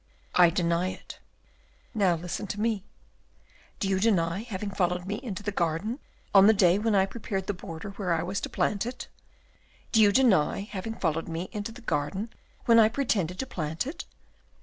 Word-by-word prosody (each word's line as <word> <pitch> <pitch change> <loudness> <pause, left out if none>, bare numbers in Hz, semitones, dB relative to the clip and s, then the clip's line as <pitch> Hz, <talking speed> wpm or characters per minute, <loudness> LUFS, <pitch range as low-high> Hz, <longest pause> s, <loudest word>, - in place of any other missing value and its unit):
"I 175 -1 +7
deny 170 +1 +1
it." - - -9 0.7
"Now 195 -5 +3
listen 175 +4 -5
to 205 - -5
me. 215 -3 0 1.0
Do 195 - 0
you 190 -1 +1
deny 190 -4 +2
having 210 -3 -5
followed 180 -2 0
me 205 +2 -3
into 210 -6 -5
the 205 - -2
garden, 190 - -1 0.3
on 195 0 +8
the 220 - +6
day 185 -1 +4
when 220 0 +1
I 190 -1 +4
prepared 195 -2 -4
the 205 - -1
border 180 0 -7
where 195 -3 -3
I 165 -1 +1
was 190 +3 -3
to - - -4
plant 210 +2 0
it? 250 +1 -7 0.8
Do 220 - +5
you 205 -1 +6
deny 200 - +3
having 205 +2 -5
followed 165 -4 -1
me 165 +2 -4
into 210 +1 -4
the 245 +2 -12
garden 175 +5 -2 0.3
when 230 -1 +6
I 220 -1 +6
pretended 210 - -1
to 265 - -2
plant 160 -6 -3
it? 290 +6 -6
195 Hz, 185 wpm, -28 LUFS, 175-220 Hz, 1.0 s, on